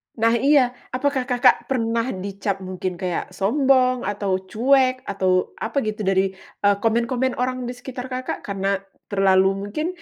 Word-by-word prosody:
Nah 230 0 +3
iya. 275 -2 +4 0.2
Apakah 265 -1 0
Kakak 250 0 +3
pernah 230 -2 0 0.2
dicap 200 -1 -3
mungkin 185 0 -4
kayak 180 0 -3
sombong 255 +3 +2
atau 200 -2 -1
cuek 255 +2 +3
atau 185 -2 0
apa 225 +5 -4
gitu 215 0 -3
dari, 190 0 +2 0.3
eee, 205 0 +5
komen-komen 240 +3 +1
orang 255 0 -2
di 245 - -4
sekitar 250 0 -7
Kakak 255 0 -4
karena 195 0 -1 0.3
terlalu 190 -1 +4 0.2
mungkin, 305 +10 -2
230 Hz, 145 wpm, -22 LUFS, 195-255 Hz, 0.3 s, eee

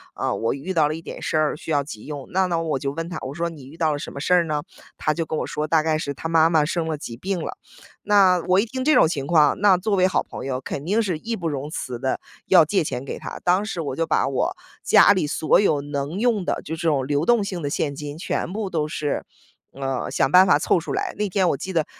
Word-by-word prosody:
呃， - - -1
我 115 - -1
遇 155 +8 -5
到 155 -4 +3
了 150 - -2
一 165 - -8
点 - - -8
事 - - -1
儿 155 -1 +1
需 155 - -11
要 145 -2 +2
急 110 -7 -9
用”。 145 -3 -7
那 190 +1 +3
那 170 -2 0
我 160 -4 -1
就 140 - -2
问 165 +2 -4
他， 175 -3 -5
我 130 +2 -6
说： 170 +1 -1
“你 145 -5 -12
遇 150 +4 -13
到 160 -2 +2
了 145 - -2
什 - - -7
么 - - -7
事 165 +5 +1
儿 180 -1 +5
呢？” 150 -2 -2 0.3
他 155 - 0
就 165 - -2
跟 160 -1 -4
我 - - -2
说， 150 +1 -3
大 155 0 +3
概 155 -1 +1
是 140 -2 -4
他 165 - -5
妈 165 0 +4
妈 160 -3 +3
生 165 +1 -2
了 155 -1 -2
急 120 -5 -7
病 185 +8 -3
了。 - - -6 0.4
那 195 -3 +4
我 185 +1 +4
一 205 - +2
听 260 +3 -4
这 305 +2 +4
种 - - +6
情 140 -4 -3
况， 155 -3 +4
那 195 -2 +5
作 200 +3 0
为 185 -1 +4
好 185 - 0
朋 - - -8
友， 130 -1 -2
肯 135 - -5
定 205 +8 +1
是 180 -6 -1
义 230 +6 -3
不 170 -5 -4
容 145 -1 -3
辞 130 -6 -5
地 130 +1 -1 0.3
要 175 -4 +7
借 185 +3 +1
钱 135 -3 -4
给 - - -6
他。 - - -7
当 180 +3 +3
时 180 -5 -4
我 145 -4 -4
就 165 +2 -1
把 160 - +2
我 330 - -1 0.3
家 - - +6
里 185 -7 +1
所 155 +1 +2
有 150 -8 +2
能 145 +3 -4
用 225 -3 +1
的 - - -1
就 160 - -4
这 165 +1 -3
种 140 -4 +1
流 145 +2 0
动 235 +3 +3
性 190 -3 -4
的 145 - -2
现 140 0 -1
金 145 +1 -7
全 170 - -3
部 210 -2 -3
都 155 -4 -1
是， 150 -1 -3 0.5
呃， 135 -1 -3
想 135 - +1
办 185 +3 +7
法 - - +5
凑 - - +2
出 170 - -5
来。 - - -2
那 210 0 0
天， 190 -1 +2
我 140 - 0
记 190 +7 -6
得 160 -3 +1
160 Hz, 305 characters per minute, -23 LUFS, 145-185 Hz, 0.5 s, 要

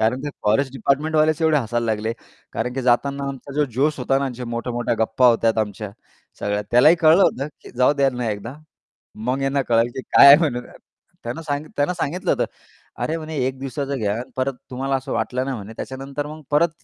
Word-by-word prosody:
कारण 115 +4 +1
ते 145 - -3
फॉरेस्ट 120 +6 +2
डिपार्टमेंटवालेच 155 +4 +1
एवढे 160 -1 +4
हसायला 120 -2 -2
लागले. 110 0 -1 0.4
कारण, 125 +2 -2
की 135 - -2
जाताना 140 +3 +1
आमचा 140 +1 -8
जो 150 0 +2
जोश 150 +3 +1
होता 135 +1 +1
ना, 140 - -1
आमच्या 125 -2 -5
मोठ्या-मोठ्या 120 0 -2
गप्पा 110 +3 +3
होत्या 115 -1 +3
आमच्या, 105 0 -4 0.5
सगळ्या 105 0 -1
त्यालाही 150 +8 +6
कळलं 165 +4 +6
होतं, 135 +2 +1
की - - -13
जाऊ 125 +3 +4
द्या 140 -2 +2
त्यांना 125 -3 -2
एकदा. 105 +5 -6 0.7
मग 130 +2 0
यांना 135 +1 +1
कळालं, 115 0 +3
की 130 - -6
काय 140 - +6
आहे 140 - +11
म्हणून 135 -7 -1 0.6
त्यानं 120 +7 -5
सांगित 150 0 -4
त्यांना 145 +5 +1
सांगितलं 175 +1 -2
होतं, - - +1 0.6
"अरे 160 - -1
म्हणे 155 -1 -6
1 130 - -4
दिवसाचं 135 +1 -3
यान, 110 +4 -2
परत 130 +1 -1 0.2
तुम्हाला 135 +2 -1
असं 130 - -4
वाटलं 130 +1 -1
ना 135 -1 -2
म्हणे, 105 0 -8
त्याच्यानंतर 135 +2 -5
मग 155 +1 -9
परत, 155 +3 +4
135 Hz, 195 wpm, -22 LUFS, 120-145 Hz, 0.7 s, आहे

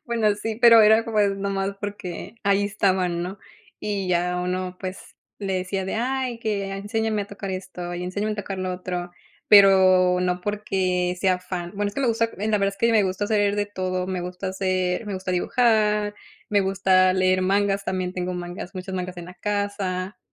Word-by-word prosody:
Bueno, 220 -3 +2
sí, 220 +1 -4
pero 230 -2 +8
era, 220 +2 +5
pues, 210 -3 +1
nomás 195 0 -2
porque 200 0 -6
ahí 200 0 +2
estaban, 185 -4 0
¿no? 185 +3 -6 0.4
Y 200 -3 -3
ya 180 0 +1
uno, 180 0 -3
pues, 185 0 -5 0.4
le 195 -2 -2
decía 185 +1 -2
de: 190 - -3
"Ay, 255 0 -1
que 205 -3 -2
enséñame 215 +2 -1
a 200 - -9
tocar 200 -1 -7
esto, 185 -2 -5
y 175 - -4
enséñame 205 +4 -2
a - - -5
tocar 195 -1 -5
lo 185 0 -2
otro", 180 -1 -4 0.4
pero 185 -2 +6
no 180 0 0
porque, 185 -3 -1
sea 185 -1 +2
fan. 180 -1 -5
Bueno, 205 0 -1
es 205 - -9
que - - -2
me 255 - +2
gusta 230 0 +1
en 215 +2 -1
la 210 - +3
verdad 195 0 0
es - - -24
que 230 +2 +3
me 215 - +5
gusta 190 +2 -1
saber 205 -1 +2
de 205 - 0
todo. 185 -2 -3
Me 185 -1 -3
gusta 180 +2 -5
hacer 185 +1 -1
me 205 - -3
gusta 185 0 -4
dibujar, 210 0 +2 0.4
me 205 -1 +4
gusta 190 -1 +3
leer 185 0 +2
mangas, 200 +1 +1
también 185 -1 -2
tengo 180 0 -3
mangas, 175 +2 -6
muchos 185 +1 -6
mangas 180 0 -4
en 175 -1 -8
la 180 - -11
casa. 200 -1 -3
195 Hz, 200 wpm, -24 LUFS, 185-205 Hz, 0.4 s, pero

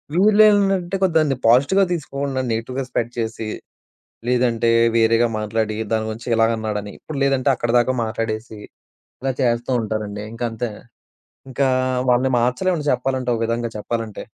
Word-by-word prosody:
వీళ్ళేంటంటే 200 -2 +4
కొద్దిగ 170 -4 +3
దాన్ని 140 -4 0
పాజిటివ్‌గా 140 +12 +4
తీసుకోకుండా, 140 -4 -3
నెగెటివ్‌గా 125 +4 -3
స్పెడ్ 120 -1 -1
చేసి, 110 -1 -3 0.8
లేదంటే 120 -2 +2 0.3
వేరేగా 115 +1 +4
మాట్లాడి 110 0 -1 0.2
దాని 110 -1 +1
గురించి 115 +2 -7
ఇలాగన్నాడని 110 -2 0
ఇప్పుడు 155 -3 -7
లేదంటే 135 0 +2
అక్కడిదాకా 120 +1 +1
మాట్లాడేసి 110 0 -4 0.7
ఇలా 135 0 0
చేస్తూ 120 +1 0
ఉంటారండి. 105 -2 -4
ఇంకంతే 115 0 -3 0.8
ఇంకా 135 +1 +1 0.4
వాళ్ళని 130 +2 +3
మార్చలేమండి 150 +7 0
చెప్పాలంటే. 130 0 -1
ఒక 115 - -4
విధంగా 115 +1 -2
చెప్పాలంటే. 110 0 -4
120 Hz, 120 wpm, -21 LUFS, 115-135 Hz, 0.8 s, వీళ్ళేంటంటే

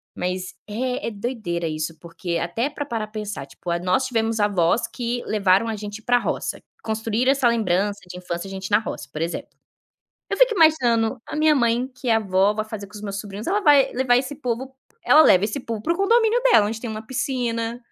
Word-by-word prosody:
Mas 185 0 -3
é 250 +4 -2
é - - -2
doideira 200 -6 -3
isso 155 0 -4
porque, 170 0 -4
até 230 - -1
pra 290 -1 -5
parar 225 -5 -3
pra - - -25
pensar, 205 -9 -5
tipo, 155 +6 -10
nós 185 +9 +1
tivemos 225 -2 0
avós 205 +2 +2
que 240 0 -3
levaram 200 +1 +2
a 220 - -2
gente 210 +1 -7
pra 245 +2 +3
roça. - - -2 0.2
Construíram 225 +3 0
essa 265 -3 +2
lembrança 205 -2 0
de 180 0 -8
infância, 180 +1 -5
a - - -8
gente 190 +1 -6
na 210 - +5
roça, 125 - -6
por 155 - -5
exemplo. 170 +1 -3 0.8
Eu - - 0
fico - - +5
imaginando, 250 - +3
a - - -7
minha 305 0 +4
mãe, 240 0 +1
que 255 -1 -7
é 225 - +5
avó, 200 -1 +2
vai 215 0 -2
fazer 215 -2 -7
com 205 - -19
os 210 - -9
meus 200 0 -4
sobrinhos, 205 +1 -8
ela 405 +4 +1
vai 290 -6 +5
levar 245 -1 +3
esse 265 +2 -2
povo 255 -1 -3 0.3
ela 305 - +7
leva 195 -10 +6
esse 220 +6 -3
povo 225 -3 -5
para 335 - +1
o - - -3
condomínio 455 +3 +3
dela, 460 - +5
onde 225 +1 -4
tem 240 - -5
uma 220 0 -6
piscina. 240 -3 -2
225 Hz, 215 wpm, -23 LUFS, 200-255 Hz, 0.8 s, ela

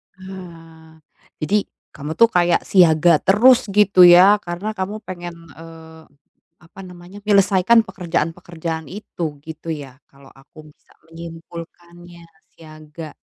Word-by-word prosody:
Ah, 165 -4 -13 0.4
Jadi 205 +6 -1 0.3
kamu 150 +2 -7
tuh 230 0 +5
kayak 175 -3 +1
siaga 170 -3 +4
terus 245 +5 +4
gitu 195 -3 +5
ya 185 +4 +7
karena 175 +5 -6
kamu 205 +3 -5
pengen, 175 -1 -8 0.2
eee, 160 -1 -14 0.5
apa 175 +4 -19
namanya 180 +2 -13
menyelesaikan 200 +2 +3
pekerjaan-pekerjaan 165 -3 -5
itu 170 -6 -7
gitu 160 +1 -9
ya, 140 -4 -8
kalau 135 -1 -19
aku 150 +3 -18
bisa - - -41 0.2
menyimpulkannya 170 +1 -12 0.3
siaga. 155 0 -12
175 Hz, 115 wpm, -19 LUFS, 160-190 Hz, 0.5 s, ya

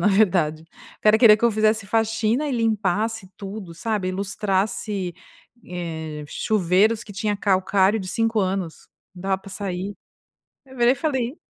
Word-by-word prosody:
na 175 - +1
verdade, 175 -7 +2 0.4
o - - -57
cara 215 0 +5
querer 225 -3 +8
que 235 - -1
eu 235 - +5
fizesse 215 -1 +1
faxina 225 +5 +1
e - - -2
limpasse 220 -2 0
tudo, 195 -3 -7
sabe, 205 +1 -2
ilustrasse, 195 -1 -1 0.5
eh, 160 -4 -5
chuveiros 210 +1 +2
que 205 - -11
tinha 205 +2 -1
calcário 195 +1 +2
de 190 - -6
5 225 +3 0
anos, 185 -3 -3 0.3
não 180 - -11
dava 190 0 0
para 195 +1 -13
sair. 195 0 -4 0.8
Eu 265 - -13
virei 240 0 +5
e - - -8
falei:" 265 -2 -2
200 Hz, 155 wpm, -23 LUFS, 185-220 Hz, 0.8 s, querer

